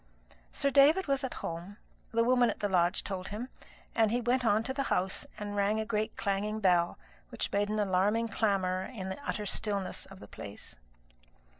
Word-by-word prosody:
Sir 280 Hz, -, +1 dB
David 290 Hz, +8 st, +6 dB
was 275 Hz, -1 st, 0 dB
at 260 Hz, -, -3 dB
home, 175 Hz, +5 st, -6 dB, 0.3 s
the 230 Hz, 0 st, +3 dB
woman 245 Hz, 0 st, +4 dB
at -, -, -4 dB
the 205 Hz, -, 0 dB
lodge 180 Hz, -1 st, +2 dB
told 190 Hz, -2 st, -4 dB
him; 225 Hz, +5 st, -5 dB, 0.4 s
and 225 Hz, -2 st, +3 dB
he 240 Hz, +3 st, +1 dB
went 245 Hz, +2 st, +1 dB
on 220 Hz, -1 st, +3 dB
to 265 Hz, -, -2 dB
the 275 Hz, -, -1 dB
house, 190 Hz, +1 st, 0 dB
and 205 Hz, 0 st, -5 dB
rang 205 Hz, +2 st, +2 dB
a 220 Hz, -, -1 dB
great 215 Hz, 0 st, -2 dB
clanging 205 Hz, +2 st, -1 dB
bell, 175 Hz, -4 st, +3 dB, 0.3 s
which -, -, -3 dB
made 205 Hz, +1 st, +1 dB
an 215 Hz, -, -1 dB
alarming 205 Hz, +3 st, +2 dB
clamour 195 Hz, -4 st, +1 dB
in 190 Hz, -6 st, -5 dB
the 280 Hz, +10 st, -6 dB
utter 210 Hz, -, -2 dB
stillness 200 Hz, -2 st, -2 dB
of 195 Hz, -1 st, -13 dB
the -, -, -11 dB
place. 100 Hz, -10 st, -9 dB
210 Hz, 190 wpm, -31 LUFS, 190-230 Hz, 0.4 s, David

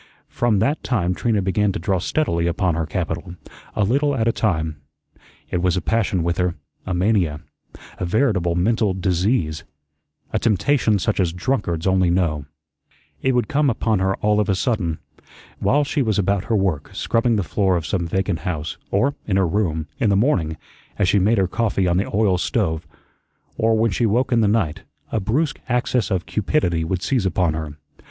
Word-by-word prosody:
From 120 Hz, -3 st, +1 dB
that 140 Hz, +10 st, +1 dB
time 90 Hz, -8 st, 0 dB
Trina 105 Hz, 0 st, 0 dB
began 100 Hz, +2 st, +1 dB
to -, -, -2 dB
draw 95 Hz, +2 st, 0 dB
steadily 85 Hz, -, 0 dB
upon 85 Hz, +1 st, +1 dB
her 80 Hz, 0 st, -2 dB
capital, 90 Hz, 0 st, -4 dB, 0.4 s
a 105 Hz, -, +2 dB
little 140 Hz, +7 st, +2 dB
at 115 Hz, -3 st, 0 dB
a -, -, +4 dB
time. 80 Hz, -9 st, -1 dB, 0.7 s
It 90 Hz, -, 0 dB
was 90 Hz, 0 st, +1 dB
a -, -, +2 dB
passion 95 Hz, -2 st, 0 dB
with 85 Hz, +1 st, -1 dB
her, 90 Hz, -1 st, +1 dB, 0.3 s
a 95 Hz, -, -1 dB
mania, 90 Hz, -6 st, +1 dB, 0.6 s
a -, -, -1 dB
veritable 95 Hz, -4 st, +1 dB
mental 105 Hz, +1 st, +1 dB
disease; 90 Hz, -3 st, 0 dB, 0.7 s
a -, -, +2 dB
temptation 110 Hz, 0 st, +2 dB
such 100 Hz, +2 st, -1 dB
as 90 Hz, -3 st, +2 dB
drunkards 90 Hz, -3 st, -2 dB
only 95 Hz, -2 st, +3 dB
know. 85 Hz, -5 st, 0 dB, 0.8 s
It 130 Hz, -, +2 dB
would 125 Hz, -1 st, +1 dB
come 150 Hz, -1 st, +2 dB
upon 110 Hz, -3 st, 0 dB
her 95 Hz, 0 st, +1 dB
all 105 Hz, 0 st, +3 dB
of 105 Hz, -, 0 dB
a 95 Hz, -, +3 dB
sudden. 95 Hz, -, -1 dB, 0.6 s
While 145 Hz, +2 st, +3 dB
she 145 Hz, +1 st, -1 dB
was 110 Hz, -5 st, +1 dB
about 100 Hz, 0 st, +1 dB
her 115 Hz, -, 0 dB
work, 95 Hz, -8 st, 0 dB
scrubbing 115 Hz, 0 st, +1 dB
the 100 Hz, -, 0 dB
floor 95 Hz, +1 st, +1 dB
of 85 Hz, -, -4 dB
some 85 Hz, -3 st, -1 dB
vacant 95 Hz, 0 st, -1 dB
house; 80 Hz, -5 st, -4 dB
or 125 Hz, +9 st, +2 dB
in 95 Hz, -3 st, +1 dB
her 95 Hz, -, +3 dB
room, 80 Hz, -4 st, -1 dB
in 110 Hz, -, +2 dB
the 100 Hz, -, +3 dB
morning, 90 Hz, -, +1 dB, 0.4 s
as 100 Hz, -3 st, +2 dB
she 100 Hz, -, +4 dB
made 105 Hz, +5 st, +3 dB
her 95 Hz, -1 st, +2 dB
coffee 105 Hz, -2 st, 0 dB
on 85 Hz, 0 st, +2 dB
the 95 Hz, -, 0 dB
oil 100 Hz, -3 st, +2 dB
stove, 85 Hz, -7 st, -1 dB, 0.7 s
or 110 Hz, 0 st, +2 dB
when 115 Hz, 0 st, +2 dB
she 115 Hz, +5 st, +1 dB
woke 125 Hz, +5 st, +1 dB
in 120 Hz, -2 st, +4 dB
the 105 Hz, -, +3 dB
night, 100 Hz, -8 st, 0 dB, 0.3 s
a 110 Hz, -, 0 dB
brusque 130 Hz, +10 st, 0 dB
access 125 Hz, -2 st, +1 dB
of 95 Hz, -3 st, -1 dB
cupidity 95 Hz, -, 0 dB
would 90 Hz, +2 st, -2 dB
seize 120 Hz, -8 st, +1 dB
upon 90 Hz, -2 st, +1 dB
her. 80 Hz, -2 st, -5 dB
95 Hz, 190 wpm, -21 LUFS, 85-115 Hz, 0.8 s, a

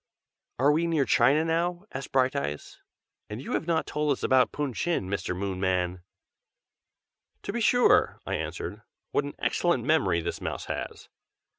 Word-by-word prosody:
"Are 140 Hz, +4 st, +4 dB
we 165 Hz, +3 st, +1 dB
near 160 Hz, -5 st, +2 dB
China 150 Hz, +5 st, +4 dB
now?" 175 Hz, +3 st, -1 dB
asked 130 Hz, +1 st, -6 dB
Brighteyes. 100 Hz, -, -1 dB, 0.5 s
"And 105 Hz, +2 st, -5 dB
you 135 Hz, -, -7 dB
have 165 Hz, -, -1 dB
not 165 Hz, -2 st, +1 dB
told 150 Hz, 0 st, -1 dB
us -, -, -8 dB
about 130 Hz, -1 st, +4 dB
Pun 145 Hz, -3 st, -3 dB
Chin, 165 Hz, -, -1 dB
Mr. 95 Hz, -2 st, -2 dB
Moonman!" 95 Hz, -2 st, -1 dB, 1.4 s
"To 200 Hz, -, -4 dB
be 235 Hz, -, -2 dB
sure!" 245 Hz, +3 st, +4 dB
I -, -, -3 dB
answered. -, -, -4 dB, 0.3 s
"What 145 Hz, -, +1 dB
an 145 Hz, -, -7 dB
excellent 175 Hz, -1 st, +1 dB
memory 95 Hz, -, +2 dB
this 85 Hz, -, -4 dB
mouse -, -, -4 dB
has! -, -, -5 dB
140 Hz, 155 wpm, -27 LUFS, -, 1.4 s, Are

